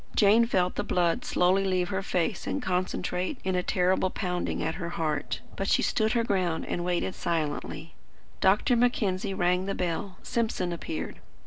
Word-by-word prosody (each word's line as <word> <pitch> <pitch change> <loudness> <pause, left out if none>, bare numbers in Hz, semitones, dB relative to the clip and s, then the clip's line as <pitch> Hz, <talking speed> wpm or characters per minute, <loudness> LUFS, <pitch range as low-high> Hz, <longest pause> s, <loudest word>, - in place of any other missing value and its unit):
Jane 215 +3 +6
felt 180 -5 +1
the 205 - 0
blood 175 -4 +1
slowly 185 +2 +3
leave 185 -2 +1
her 190 -1 -1
face 185 0 -1
and 285 - -1
concentrate 185 +1 -1
in 190 - 0
a 180 - +2
terrible 185 +1 +2
pounding 180 -1 -2
at 160 - -1
her 170 - -3
heart. 155 -3 -2
But 195 - -2
she - - +3
stood 220 0 +1
her 235 -1 +2
ground, 180 -7 0
and 175 - -2
waited 180 +1 0
silently. 160 0 -3 0.5
Dr. 205 +6 +4
Mackenzie 205 -5 +1
rang 180 +1 +2
the 195 - -1
bell. 180 +2 -2
Simpson 220 -6 -1
appeared. 165 -1 -5
185 Hz, 165 wpm, -28 LUFS, 175-200 Hz, 0.5 s, Jane